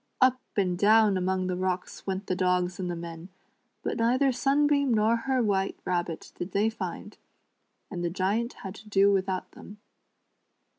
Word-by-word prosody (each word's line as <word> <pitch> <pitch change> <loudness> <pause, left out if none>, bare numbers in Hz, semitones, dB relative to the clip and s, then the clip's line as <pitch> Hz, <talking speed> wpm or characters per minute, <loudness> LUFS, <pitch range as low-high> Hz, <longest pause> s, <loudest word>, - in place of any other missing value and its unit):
Up 255 0 +4 0.2
and 185 -3 +2
down 215 0 +5
among 185 0 0
the 180 0 -1
rocks 185 +1 -3
went 190 +1 -2
the 185 - -1
dogs 180 0 0
and 180 -1 -2
the 175 - -2
men, 170 +1 -8 0.5
but - - -2
neither 255 +4 +3
Sunbeam 280 +1 +2
nor 220 +1 +3
her 255 +2 0
White 195 -2 0
Rabbit 175 -2 -2
did 175 +1 -6
they 210 +3 +2
find, 225 - -7 0.7
and 175 -3 -4
the 170 - 0
Giant 200 +7 -1
had 190 -1 -5
to 215 0 -14
do 200 0 +4
without 190 -1 -1
them. 210 +1 -13
195 Hz, 165 wpm, -28 LUFS, 180-230 Hz, 0.7 s, down